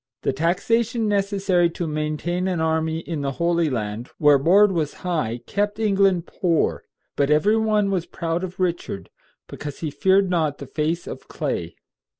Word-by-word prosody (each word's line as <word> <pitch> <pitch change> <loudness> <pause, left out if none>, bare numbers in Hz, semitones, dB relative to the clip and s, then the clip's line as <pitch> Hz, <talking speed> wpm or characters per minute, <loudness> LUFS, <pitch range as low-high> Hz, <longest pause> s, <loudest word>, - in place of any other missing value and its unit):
The - - +1
taxation 220 - +1
necessary 195 -3 +2
to 170 +1 -4
maintain 155 +4 -2
an 180 -3 -1
army 160 0 0
in 165 -3 -4
the 140 -1 -2
Holy 170 +2 +1
Land, 110 -1 -4
where 150 -2 +5
board 195 +8 +5
was 160 -5 -1
high, 150 -10 -1
kept 205 +1 -1
England 195 -5 +2
poor; 170 -4 0 0.3
but 140 0 +1
every 175 +9 +4
one 215 -2 +2
was 180 -3 -1
proud 170 0 -3
of 185 0 -6
Richard, 170 - -2 0.4
because 145 -1 -8
he 155 -3 -2
feared 190 +5 +3
not 160 -5 0
the 140 - -8
face 155 +5 -2
of - - -8
clay. 85 0 -3
170 Hz, 160 wpm, -23 LUFS, 150-195 Hz, 0.4 s, where